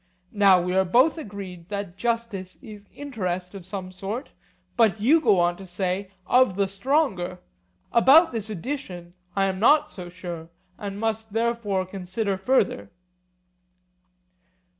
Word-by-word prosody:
Now 200 -3 +6
we 180 +1 -2
are 190 - +4
both 255 - +3
agreed 195 - -8
that 200 -3 -4
justice 230 -4 -3
is 210 -4 -11
interest 185 -10 -4
of 190 -3 -9
some 185 -1 -6
sort, 200 +8 -5 0.4
but 220 -6 +3
you 290 +10 +4
go 210 - +4
on 175 0 +2
to 195 - -11
say 185 +2 -2 0.2
'of 250 -3 +4
the 200 0 +1
stronger'; 195 - 0 0.5
about 275 +8 +6
this 220 -3 -4
addition 190 - -6 0.2
I 195 -1 +2
am 190 -1 -2
not 295 +7 +4
so 180 -2 -8
sure, 175 -2 -8 0.3
and 200 -1 -5
must 220 -1 -2
therefore 225 -4 0
consider 190 +2 -3
further. 190 - +1
200 Hz, 140 wpm, -25 LUFS, 185-230 Hz, 0.5 s, Now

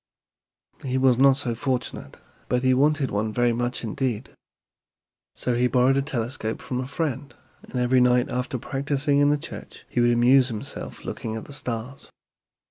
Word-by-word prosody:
"He 130 -1 -1
was 130 -2 +4
not 135 0 +6
so 125 -4 -1
fortunate, 125 +1 -3 0.3
but 125 0 +1
he 130 0 +4
wanted 145 +1 +2
one 110 +2 -1
very 120 +1 +2
much 120 +2 -2
indeed. 120 +1 -2 1.0
So 125 - -1
he 120 +1 +2
borrowed 125 +1 +3
a 140 - +2
telescope 120 -4 -3
from 125 - -4
a 130 - -5
friend, 140 -1 -3 0.3
and - - -13
every 125 +1 +3
night 125 +1 +4
after 125 0 -2
practicing 140 +2 0
in 145 0 +4
the 150 - +3
church - - -9
he - - -2
would 120 0 +4
amuse 125 +2 +5
himself 110 -5 -7
looking 110 -1 -4
at 110 - -6
the 145 - -10
stars. 125 0 -5
125 Hz, 170 wpm, -25 LUFS, 120-135 Hz, 1.0 s, not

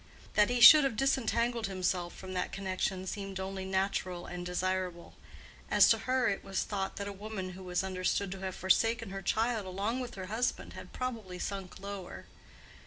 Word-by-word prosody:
That 210 +1 +4
he 245 0 +1
should 300 +6 +11
have 270 -5 0
disentangled 235 -3 +1
himself 185 -2 -2
from 190 -1 -8
that 180 -1 -2
connection 190 -1 -2
seemed 195 0 -5
only 190 0 -4
natural 190 -2 -1
and 175 0 -6
desirable. 180 -1 -2 0.6
As - - +6
to - - +3
her, 255 -2 +3
it 200 - -1
was 195 -1 -1
thought 195 -2 -3
that 200 - -4
a 200 - -5
woman 200 -2 -5
who 185 +1 -10
was 180 0 -1
understood 185 +1 -1
to 195 - -6
have 190 -1 -4
forsaken 225 +3 +2
her 195 0 -5
child 220 +1 0
along 200 +7 -2
with 245 -2 -6
her 190 -2 -6
husband 220 +6 -2
had - - -10
probably 225 -8 -4
sunk 195 0 -5
lower. 200 -2 -7
195 Hz, 180 wpm, -31 LUFS, 185-220 Hz, 0.6 s, should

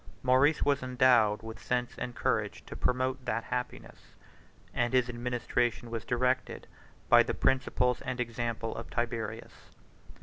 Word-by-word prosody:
Maurice 130 +4 +4
was 140 -1 +2
endowed 125 -4 +3
with 110 0 -8
sense 125 -1 -1
and 120 - -5
courage - - -1
to - - -9
promote 130 +1 0
that 115 +1 -1
happiness, 125 0 -6 0.6
and 120 0 0
his 125 -1 +3
administration 120 -1 -1
was 115 -2 -4
directed 125 +1 0 0.4
by - - +7
the - - -1
principles 125 -1 +1
and 130 -1 -4
example 115 -1 -3
of - - -7
Tiberius. 115 -2 -4
125 Hz, 135 wpm, -30 LUFS, 115-130 Hz, 0.6 s, by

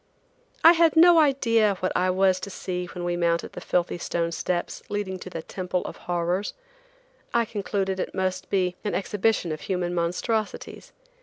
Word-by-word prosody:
I 330 - +10
had 335 -2 +4
no 340 +1 +7
idea 230 -8 +3
what 185 0 -2
I 185 +1 +2
was 185 0 +3
to 200 - -6
see 180 -2 -4
when 175 0 -7
we 175 0 -1
mounted 170 -1 0
the - - -7
filthy 175 0 -1
stone 170 0 -1
steps 175 +1 -2
leading 200 -2 -3
to 185 - -8
the 165 -2 -6
Temple 180 -1 -3
of - - -6
Horrors. 175 +3 -2 0.8
I 235 0 +3
concluded 195 -2 -2
it - - -4
most 185 -1 -2
be 180 -2 +1
an 205 - -2
exhibition 200 -2 0
of 155 - -5
human 180 -2 -2
monstrosities. 180 +6 -2
185 Hz, 170 wpm, -25 LUFS, 175-210 Hz, 0.8 s, I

